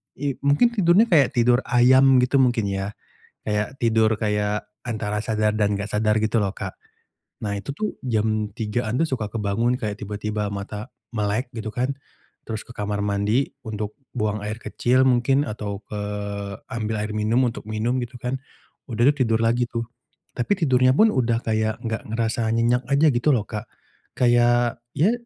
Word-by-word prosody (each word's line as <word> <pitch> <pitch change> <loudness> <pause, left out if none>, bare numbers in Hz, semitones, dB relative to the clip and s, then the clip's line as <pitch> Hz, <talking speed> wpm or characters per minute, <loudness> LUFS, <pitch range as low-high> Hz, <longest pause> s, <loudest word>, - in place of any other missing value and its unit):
i 140 0 -1
mungkin 145 +13 +3
tidurnya 195 -1 +4
kayak 145 -6 +4
tidur 120 +1 +4
ayam 130 +2 +6
gitu 135 +2 +2
mungkin 120 -3 +3
ya? 95 0 -2 0.6
Kayak 105 +5 -1
tidur, 110 -2 +3
kayak 105 0 -1 0.2
antara 105 -3 -3
sadar 110 -1 0
dan 105 -2 +1
gak 100 - -3
sadar 105 0 +2
gitu 110 +1 +1
loh, 100 - 0
Kak. 100 -1 -6 0.7
Nah, 100 -1 -2
itu 140 +6 -6
tuh 215 +4 -3
jam 110 -2 0
3:00-an 110 0 -2
tuh 165 - +2
suka 115 -5 -1
kebangun 115 +3 0
kayak 105 -4 -4
tiba-tiba 105 0 -3
mata 105 +3 -6 0.2
melek 110 +3 -1
gitu 110 -2 -5
kan, 130 +3 0 0.5
terus 110 -1 -4
ke 120 - -12
kamar 105 -2 -2
mandi 105 +6 +1
untuk 105 +1 -5 0.2
buang 110 -2 -1
air 105 +1 -4
kecil 125 +2 +1
mungkin 130 +2 +3
atau 105 -4 -5
ke 105 - -6 0.7
ambil 110 -2 -2
air 105 - -4
minum 110 +4 +1
untuk - - -10
minum 115 +4 -1
gitu 120 +1 -6
kan. 125 +2 -3 0.5
Udah 120 +3 +3
tuh, - - -17
tidur 115 0 +1
lagi 120 +2 +2
tuh, 115 -1 -3 0.5
tapi 125 +11 0
tidurnya 130 -6 +3
pun 220 0 +6
sudah 120 -2 +1
kayak 110 0 -1
nggak 110 -1 -2
ngerasa 115 0 0
nyenyak 120 +2 +2
aja 140 +3 +4
gitu 120 +5 0
loh, 110 - 0
Kak. 105 -1 -6 0.5
Kayak 120 -1 +3 0.2
ya, 190 +10 +4
115 Hz, 170 wpm, -23 LUFS, 105-125 Hz, 0.7 s, ayam